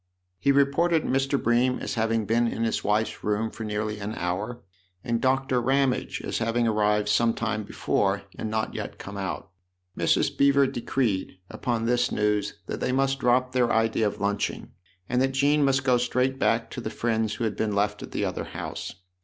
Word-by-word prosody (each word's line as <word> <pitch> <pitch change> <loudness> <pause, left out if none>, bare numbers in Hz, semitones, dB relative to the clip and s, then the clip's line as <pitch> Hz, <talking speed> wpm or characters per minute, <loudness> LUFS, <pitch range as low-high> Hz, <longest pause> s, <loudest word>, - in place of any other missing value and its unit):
He 140 - +3
re 140 0 +5
ported 165 +3 +1
Mr. 135 +2 +1
Bream 120 +2 +2
as - - -4
having 115 -2 0
been 115 +3 +2
in 115 - -2
his 115 - 0
wife's 105 +2 0
room 105 +2 0
for 115 - -7
nearly 105 0 -3
an 105 +2 -4
hour, 100 +7 -3 0.4
and 115 -1 -1
Dr. 130 -1 +2
Ramage 135 +1 0
as - - -2
having 115 +1 +1
arrived 105 -1 +2
some 115 +2 +3
time 110 -2 -1
before - - 0
and 110 - -4
not 110 0 -1
yet - - -5
come 100 - -8
out. 95 -3 -4 0.4
Mrs. - - +1
Beever 140 0 +4
decreed, 120 -7 -1
upon 115 -2 -2
this 120 +1 +2
news, 105 -1 0
that - - -4
they - - 0
must 135 +1 +1
drop 125 0 +2
their 125 -2 +2
idea 115 -1 +2
of 105 - -4
lunching 100 0 -2 0.4
and 125 - +1
that 135 0 +1
Jean 145 +2 +3
must 135 -1 +2
go 130 -2 +4
straight 125 +2 0
back 115 -2 +1
to 125 - -5
the 110 - -4
friends 110 -2 -1
who 120 - -4
had 110 -2 -1
been 105 -2 -1
left 105 0 0
at - - -7
the - - -2
other - - -3
house. - - -6
115 Hz, 195 wpm, -26 LUFS, 105-130 Hz, 0.4 s, re